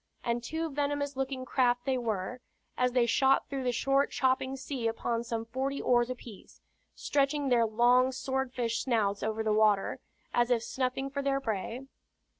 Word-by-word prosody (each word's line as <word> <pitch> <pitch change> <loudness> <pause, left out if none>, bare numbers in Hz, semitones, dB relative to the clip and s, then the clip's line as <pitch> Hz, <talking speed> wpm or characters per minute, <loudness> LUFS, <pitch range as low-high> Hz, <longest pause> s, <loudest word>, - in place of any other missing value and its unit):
And 235 0 -1
two 320 +5 -3
venomous 285 0 -1
looking 265 -1 -3
craft 245 -2 +1
they 265 - +1
were, 225 +1 -3 0.3
as 250 -1 +1
they 250 -2 +4
shot 265 +3 +3
through 275 -2 -4
the 250 - +1
short 275 +3 +2
chopping 260 0 0
sea 260 -3 -3
upon 230 +1 -1
some 230 -1 -3
forty 265 +4 -2
oars 240 0 +2
apiece, 240 -5 -10 0.4
stretching 280 0 0
their 235 -2 +4
long 245 +4 +4
sword 265 0 -2
fish 235 -2 -1
snouts 215 -6 +1
over 220 +1 -1
the 215 -1 +1
water, 210 -2 +2 0.3
as 240 0 +2
if 235 -2 +2
snuffing 265 +2 -2
for 280 0 -2
their 275 0 +1
prey. 230 +2 -4
250 Hz, 170 wpm, -30 LUFS, 230-270 Hz, 0.4 s, they